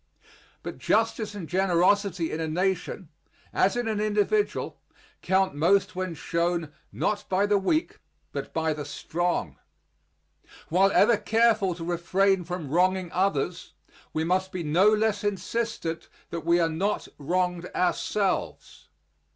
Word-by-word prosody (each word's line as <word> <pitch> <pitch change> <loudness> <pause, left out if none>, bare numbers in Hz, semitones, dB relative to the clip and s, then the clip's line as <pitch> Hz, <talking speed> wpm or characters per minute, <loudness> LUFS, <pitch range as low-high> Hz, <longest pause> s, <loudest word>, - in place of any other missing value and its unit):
But - - -7
justice 220 -1 0
and 185 -6 -6
generosity 185 0 +2
in 155 - -3
a 160 - -2
nation, 180 0 -2 0.4
as 195 +5 +2
in 240 -1 -1
an 215 -2 -1
individual, 215 - 0 0.4
count 190 0 +2
most 185 +5 +2
when 185 -2 -3
shown 170 0 -1 0.2
not 210 - -2
by 190 +2 +2
the 205 -1 +3
weak 310 - 0 0.3
but - - -5
by 160 -1 0
the 150 -1 -5
strong. 150 - -2 1.1
While 190 +4 +4
ever 225 +1 +5
careful 215 -3 +2
to 165 - -7
refrain 180 +2 +1
from 170 -5 -5
wronging 185 +1 +2
others, 180 -2 -1 0.4
we 155 - -1
must 185 +3 0
be 180 -2 -4
no 170 +7 +4
less 215 -1 +1
insistent 205 -4 -3 0.2
that 170 -1 -5
we 170 +1 +4
are 165 - +3
not 185 +6 -1
wronged 180 +3 -1
ourselves. 190 +2 -1
185 Hz, 135 wpm, -26 LUFS, 170-205 Hz, 1.1 s, ever